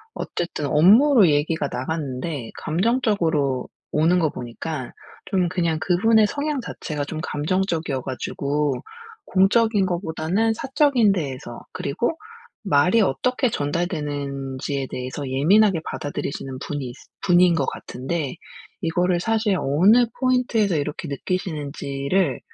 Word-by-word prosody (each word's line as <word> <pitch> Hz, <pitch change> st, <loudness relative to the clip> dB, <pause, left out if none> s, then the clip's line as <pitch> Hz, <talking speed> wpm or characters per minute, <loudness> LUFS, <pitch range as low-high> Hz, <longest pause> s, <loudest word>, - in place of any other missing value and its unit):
어쨌든 170 Hz, -3 st, -3 dB
업무로 205 Hz, -, +6 dB
얘기가 150 Hz, 0 st, +1 dB
나갔는데 135 Hz, -2 st, -4 dB
감정적으로 165 Hz, -, 0 dB, 0.2 s
오는 165 Hz, +4 st, +3 dB
거 160 Hz, -3 st, +2 dB
보니까 130 Hz, +2 st, -6 dB, 0.3 s
좀 185 Hz, -3 st, +1 dB
그냥 170 Hz, -3 st, 0 dB
그분의 215 Hz, +6 st, +4 dB
성향 285 Hz, +3 st, -2 dB
자체가 150 Hz, -10 st, -5 dB
좀 155 Hz, +2 st, -5 dB
감정적이어 160 Hz, -2 st, -1 dB
가지고 140 Hz, +2 st, -2 dB, 0.5 s
공적인 205 Hz, +2 st, +3 dB
것보다는 180 Hz, +4 st, 0 dB
사적인 265 Hz, -3 st, +2 dB
데에서 135 Hz, -9 st, -4 dB
그리고 240 Hz, -, -2 dB, 0.5 s
말이 180 Hz, +6 st, +4 dB
어떻게 250 Hz, -, +1 dB
전달되는지에 145 Hz, -5 st, -3 dB
대해서 130 Hz, +3 st, -5 dB
예민하게 170 Hz, +8 st, +3 dB
받아들이시는 135 Hz, -2 st, -5 dB
분이 140 Hz, -3 st, -5 dB, 0.3 s
분인 180 Hz, -1 st, +4 dB
것 140 Hz, -4 st, +1 dB
같은데 135 Hz, +4 st, -4 dB, 0.5 s
이거를 175 Hz, +2 st, +1 dB
사실 220 Hz, 0 st, +1 dB
어느 190 Hz, -, +4 dB
포인트에서 245 Hz, -7 st, +2 dB
이렇게 145 Hz, 0 st, -3 dB
느끼시는지를 145 Hz, -1 st, -2 dB
165 Hz, 300 characters per minute, -23 LUFS, 140-200 Hz, 0.5 s, 업무로